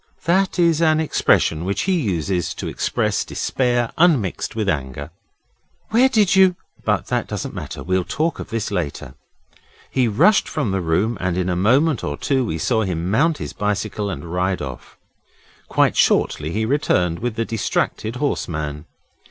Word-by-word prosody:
That 190 +3 +1
is 170 -2 +3
an 155 -1 +4
expression 85 - +2
which 100 +2 -1
he 190 - 0
uses 90 - -1
to - - -5
express - - -1
despair 120 -2 -1
unmixed 145 - +2
with 110 -2 -1
anger. 70 -3 -3 0.8
'Where 245 +4 +5
did 210 -6 +3
you? 190 -1 +5 0.3
but - - 0
that - - -1
doesn't - - -5
matter. - - -6
We'll 95 +1 0
talk 160 - -2
of - - -7
this 115 -2 -3
later.' 70 - -3 0.8
He 130 -2 +2
rushed 120 - +3
from 145 -10 -1
the 95 -1 0
room, 95 +7 0
and 90 -1 -1
in 90 0 0
a 90 - 0
moment 130 - +2
or 75 0 -3
two 135 -2 0
we 80 -9 -2
saw 110 +7 +1
him 90 -3 -2
mount 155 +7 +2
his - - -6
bicycle 105 0 -2
and 95 - -6
ride 90 +1 0
off. 65 -4 -8 0.7
Quite - - +2
shortly 75 - +2
he 110 +6 -1
returned 90 - +1
with 120 0 -3
the 115 0 -1
distracted 110 0 -2
horse 140 +3 -1
man. 75 -2 -4
110 Hz, 170 wpm, -21 LUFS, 90-150 Hz, 0.8 s, Where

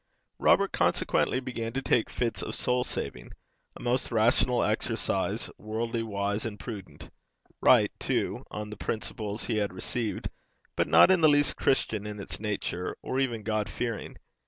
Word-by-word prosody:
Robert - - +4
consequently 130 - +1
began 115 -3 -4
to 135 - -1
take 120 - +2
fits 120 -2 -2
of - - -3
soul 125 0 +1
saving, - - -5 0.4
a - - -11
most 125 +2 0
rational 120 +2 +3
exercise, - - -1
worldly 115 +2 -2
wise 100 -1 -2
and 105 -3 -5
prudent 105 -6 -8 0.5
right - - +6
too - - -1
on 105 0 -6
the 105 - -7
principles 110 -1 -4
he 115 - -1
had 105 -2 0
received, 110 +4 -3 0.4
but - - +1
not - - +7
in 185 -2 +4
the 155 - +7
least 145 0 +3
Christian 110 -6 +1
in 105 0 -6
its 100 - -6
nature, 100 -4 -3
or 130 - -1
even 120 -5 -1
God 110 -1 -1
fearing. 115 -3 -4
115 Hz, 160 wpm, -28 LUFS, 105-125 Hz, 0.5 s, not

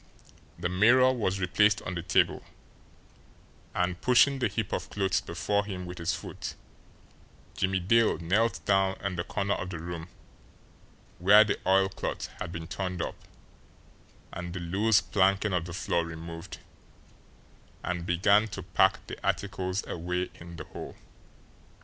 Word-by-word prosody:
The 85 +1 -1
mirror 120 +8 +5
was 100 -6 -1
replaced 100 +3 +3
on 90 - -4
the 85 - -3
table; - - +2 1.3
and, 90 0 -1
pushing 135 +2 +4
the 120 - +2
heap 105 -1 -3
of - - -3
clothes 95 -2 0
before 90 +4 -1
him 95 -3 -6
with 90 0 -8
his 85 +1 0
foot, - - -7 1.0
Jimmie 95 0 +1
Dale 115 +5 +3
knelt 100 +5 0
down 95 -1 +3
in 100 -2 -2
the 85 - -2
corner 100 +2 -1
of 90 - -4
the 90 - -5
room 85 0 -6 1.1
where 105 +5 +8
the 105 - -1
oilcloth 95 0 +1
had 85 - -4
been 80 -1 -6
turned 90 +1 -4
up - - -5 1.1
and 90 0 -6
the - - -3
loose 100 +5 +2
planking 100 0 +2
of 90 -2 0
the 90 - -7
floor 85 0 0
removed, 85 0 -8 1.3
and 90 -1 -2
began 100 +5 +3
to 95 -2 -7
pack - - +2
the - - -9
articles 95 -1 -1
away 90 +2 -3
in 85 0 -11
the 80 - -7
hole. - - -9
95 Hz, 145 wpm, -28 LUFS, 85-100 Hz, 1.3 s, where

